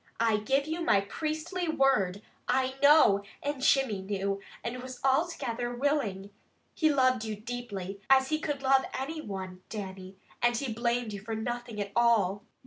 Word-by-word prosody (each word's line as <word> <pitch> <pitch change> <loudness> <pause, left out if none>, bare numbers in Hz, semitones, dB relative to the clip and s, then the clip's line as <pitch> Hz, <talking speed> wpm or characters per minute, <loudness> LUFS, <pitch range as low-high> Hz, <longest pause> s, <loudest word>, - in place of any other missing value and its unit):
"I 225 -2 +3
give 270 +7 +1
you 320 +3 -3
my 200 -12 +4
priestly 315 - -3
word, 240 - +2 0.2
I 260 0 +1
know, 285 -9 +6 0.2
and 285 -2 -2
Jimmy 265 -7 +3
knew, 195 0 -2 0.2
and 245 +2 -4
was 255 0 -8
altogether 260 -5 0
willing. 240 -8 -1 0.4
He 315 -2 +3
loved 255 -4 +3
you 220 -1 -3
deeply, 205 -4 -6
as 265 0 +5
he 310 0 +1
could 290 -3 -3
love 265 0 +4 0.2
any 310 +4 -4
one, 190 -5 -6
Dannie, 190 -2 -7 0.2
and 240 0 +3
he 250 -3 -2
blamed 235 -1 -1
you 200 - -5
for 220 +2 -4
nothing 240 0 -4
at 200 -1 -3
all. 215 -5 +3
240 Hz, 160 wpm, -29 LUFS, 205-270 Hz, 0.4 s, know